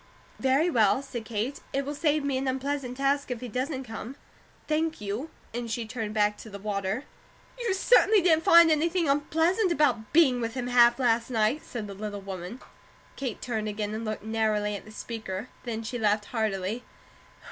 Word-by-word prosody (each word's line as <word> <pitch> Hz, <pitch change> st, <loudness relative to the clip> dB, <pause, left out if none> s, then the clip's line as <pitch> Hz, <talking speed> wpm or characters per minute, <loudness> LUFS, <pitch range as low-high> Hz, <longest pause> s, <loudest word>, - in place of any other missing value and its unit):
"Very 270 Hz, +5 st, +3 dB
well," 235 Hz, -, +3 dB
said 240 Hz, -5 st, -6 dB
Kate. 230 Hz, +5 st, -3 dB
"It 275 Hz, 0 st, 0 dB
will 290 Hz, -, -3 dB
save 300 Hz, 0 st, +1 dB
me 280 Hz, -1 st, 0 dB
an 270 Hz, -, -2 dB
unpleasant 265 Hz, -1 st, -2 dB
task 275 Hz, +1 st, +1 dB
if 250 Hz, -2 st, -3 dB
he 250 Hz, -, -6 dB
doesn't 260 Hz, +3 st, -3 dB
come. 245 Hz, +2 st, -7 dB, 0.5 s
Thank 315 Hz, +1 st, 0 dB
you," 210 Hz, +9 st, -4 dB, 0.2 s
and 240 Hz, 0 st, -4 dB
she 225 Hz, +1 st, -2 dB
turned 220 Hz, -2 st, -5 dB
back 210 Hz, -1 st, +2 dB
to 220 Hz, -, -10 dB
the 200 Hz, -, -7 dB
water. 200 Hz, +3 st, -2 dB, 0.6 s
"You 475 Hz, -4 st, -1 dB
certainly 435 Hz, +1 st, +5 dB
didn't 325 Hz, -3 st, +3 dB
find 335 Hz, -1 st, +7 dB
anything 330 Hz, +2 st, +2 dB
unpleasant 325 Hz, +7 st, +2 dB
about 250 Hz, -9 st, +1 dB
being 270 Hz, -7 st, +5 dB
with 230 Hz, +1 st, -3 dB
him 250 Hz, -2 st, -2 dB
half 240 Hz, -1 st, +5 dB
last 235 Hz, -3 st, +1 dB
night," 230 Hz, +5 st, +1 dB
said 230 Hz, -4 st, -6 dB
the 200 Hz, -, -7 dB
little 205 Hz, +1 st, -5 dB
woman. 195 Hz, +3 st, -7 dB, 0.5 s
Kate 260 Hz, -5 st, -4 dB
turned 220 Hz, -3 st, -2 dB
again, 210 Hz, 0 st, -3 dB
and 220 Hz, +1 st, -4 dB
looked 215 Hz, -1 st, -4 dB
narrowly 215 Hz, -2 st, 0 dB
at 200 Hz, -, -8 dB
the 215 Hz, -, -12 dB
speaker. 220 Hz, -1 st, -6 dB, 0.2 s
Then 225 Hz, -2 st, -3 dB
she 245 Hz, +2 st, -4 dB
laughed 210 Hz, -1 st, +2 dB
heartily. 215 Hz, 0 st, -2 dB
240 Hz, 185 wpm, -27 LUFS, 215-280 Hz, 0.6 s, find